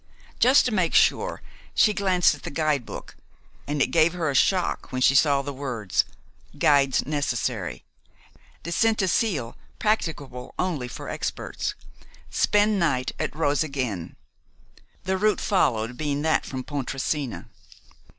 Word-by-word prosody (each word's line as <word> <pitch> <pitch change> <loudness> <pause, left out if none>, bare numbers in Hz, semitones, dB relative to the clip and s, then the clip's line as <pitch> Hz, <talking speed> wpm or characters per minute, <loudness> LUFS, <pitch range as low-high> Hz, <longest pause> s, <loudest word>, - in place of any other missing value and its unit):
Just 260 +4 +6
to 250 - 0
make 185 -5 +1
sure, - - +2 0.3
she 210 - +5
glanced 185 -5 +3
at 145 - -10
the - - -6
guidebook, 150 -5 -2 0.5
and 145 -1 +1
it - - -2
gave 165 0 +4
her 165 -5 -1
a - - -4
shock 185 +7 +1
when 130 - -2
she 130 - +5
saw 140 0 +4
the 145 0 -5
words, 125 -8 -1 0.5
"Guides 140 -4 +3
necessary," 125 -9 -2 0.8
"Descent 215 +7 +1
to 190 - +1
Sils 160 - 0 0.2
practicable 145 - -2
only 160 -9 -1
for 120 - -8
experts," - - -4 0.6
"Spend 210 0 +2
night 130 -7 +1
at - - -3
Roseg 145 -2 0
Inn," 105 -10 -3 0.9
the 190 +1 0
route 215 +1 +2
followed 125 - +1
being 145 -1 -2
that 160 - +1
from 130 -1 -5
Pontresina. 135 -1 -3
145 Hz, 135 wpm, -25 LUFS, 130-180 Hz, 0.9 s, Just